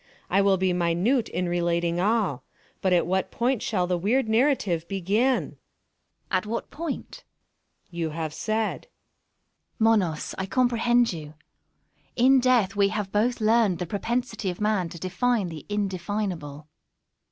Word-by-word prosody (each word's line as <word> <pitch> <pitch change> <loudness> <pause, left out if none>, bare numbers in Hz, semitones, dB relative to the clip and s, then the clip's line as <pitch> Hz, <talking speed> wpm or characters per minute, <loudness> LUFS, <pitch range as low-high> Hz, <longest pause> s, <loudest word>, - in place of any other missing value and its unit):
I 195 +2 +4
will 195 -1 +3
be 185 -1 +1
minute 180 +9 +1
in 180 +1 -2
relating 170 0 0
all—but 195 - -2
at 175 -1 +3
what 190 +2 0
point 245 0 0
shall 185 -5 0
the 180 -1 -1
weird 225 +7 +1
narrative 220 - +1
begin? 205 +8 +1
Una. - - -12 0.7
At 185 +2 0
what 230 +2 -4
point? 325 -2 -6 0.6
Monos. - - -40
You 170 -2 -2
have 155 0 -4
said. 220 +4 -2 0.9
Una. 225 0 +4
Monos, 180 -8 0
I 190 - -2
comprehend 240 -1 +2
you. 155 -2 -8 0.8
In 260 +2 +5
Death 245 -6 +2
we 200 -1 +4
have 205 -2 -3
both 235 +5 +1
learned 215 -4 +3
the 180 - -3
propensity 230 +2 -2
of 180 - -5
man 210 -5 0
to 170 - -9
define 190 +3 0
the 155 -3 -9
indefinable. 185 -7 -3
195 Hz, 145 wpm, -25 LUFS, 175-230 Hz, 0.9 s, In